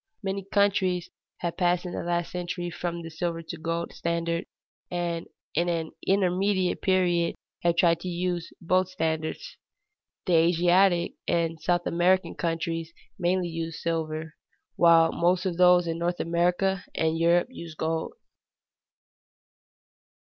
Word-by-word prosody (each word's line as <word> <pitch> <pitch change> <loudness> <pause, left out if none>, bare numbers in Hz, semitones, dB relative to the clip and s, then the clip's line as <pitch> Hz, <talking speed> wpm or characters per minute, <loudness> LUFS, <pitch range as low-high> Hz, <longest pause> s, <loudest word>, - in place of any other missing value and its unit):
Many 195 0 -2
countries 190 -3 +2 0.3
have 170 -1 -3
passed 180 0 +2
in 180 - -4
the - - -3
last 175 0 -1
century 175 0 -4
from 170 0 -4
the 165 - -8
silver 165 0 -3
to 165 - -7
the - - -17
gold 165 +1 -2
standard, 170 0 -2 0.4
and 170 -1 -2 0.3
in 170 +3 +1
an 165 -2 -2 0.2
intermediate 190 0 +1
period 180 -3 +2 0.3
have 170 -1 +2
tried 170 -1 +4
to 185 - -7
use 175 -1 -2
both 185 +2 +1
standards. 160 - -3 0.7
The 180 - +1
Asiatic 175 +2 +3
and 165 -1 0
South 175 +2 +1
American 180 +2 +2
countries 165 -1 -2 0.3
mainly 180 0 +1
use 165 -1 -4
silver, 160 -1 -3 0.4
while 165 -1 +6
most 180 +2 +1
of 180 -3 -1
those 180 -1 +6
in 165 0 -3
North 175 +1 -1
America 180 +3 +1
and 160 0 +1
Europe 170 +5 +3
use 170 -9 -9
gold. 160 +1 -2
175 Hz, 135 wpm, -27 LUFS, 165-180 Hz, 0.7 s, while